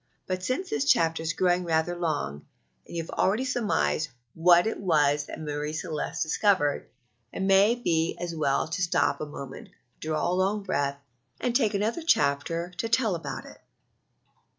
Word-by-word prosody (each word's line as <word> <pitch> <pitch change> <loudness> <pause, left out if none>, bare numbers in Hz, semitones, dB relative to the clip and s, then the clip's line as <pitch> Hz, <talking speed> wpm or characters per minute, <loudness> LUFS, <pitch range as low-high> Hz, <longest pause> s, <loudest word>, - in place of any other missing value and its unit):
But 185 0 -3
since 255 - -2
this 145 - +1
chapter 160 +3 +3
is 165 0 -1
growing 180 +1 +2
rather 165 +1 0
long, 145 - -2 0.4
and - - -9
you 165 - -1
have - - -10
already 215 +7 +1
surmised 220 -10 0 0.2
what 175 +2 +5
it 220 - -2
was 150 -5 +2
that - - -7
Marie 150 -1 -3
Celeste 160 0 -3
discovered, 155 -2 +1 0.4
it - - -7
may 195 +4 +5
be 165 -9 0
as 175 -1 -4
well 150 -2 +1
to 165 +3 -3
stop 175 - +1
a 155 - -3
moment, 140 -2 -9 0.3
draw 155 0 -1
a - - +1
long 195 +3 +1
breath, 140 -7 -1 0.4
and 240 -1 -1
take 220 -5 +2
another 220 +10 -1
chapter 170 - +1
to 225 - -1
tell 225 -3 +2
about 160 -4 -5
it. - - -14
170 Hz, 170 wpm, -27 LUFS, 155-200 Hz, 0.4 s, what